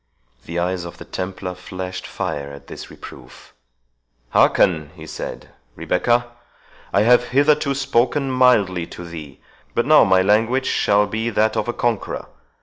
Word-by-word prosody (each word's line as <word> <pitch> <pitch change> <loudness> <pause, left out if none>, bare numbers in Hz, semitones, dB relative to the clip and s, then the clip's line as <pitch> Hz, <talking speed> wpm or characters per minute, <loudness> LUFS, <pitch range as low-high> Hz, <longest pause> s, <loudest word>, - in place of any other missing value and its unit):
The 85 - -5
eyes 90 +1 -1
of 85 - -9
the - - -10
Templar 95 0 -5
flashed 90 0 -7
fire 70 -1 -4
at 70 - -12
this - - -9
reproof—"Hearken," - - -2
he - - -10
said, - - -7 0.3
"Rebecca; 120 0 +1 0.7
I - - +3
have 120 +2 +5
hitherto 140 +2 +2
spoken 135 +1 +1
mildly 105 -10 +3
to 90 - -9
thee, 80 -5 -10 0.3
but 120 - +1
now 155 +2 +7
my 95 -3 +4
language 115 +6 +2
shall 105 -4 +2
be 110 +3 -2
that 110 0 +1
of 105 - -1
a 120 - -1
conqueror. 120 -4 -2
100 Hz, 145 wpm, -21 LUFS, 85-120 Hz, 0.7 s, now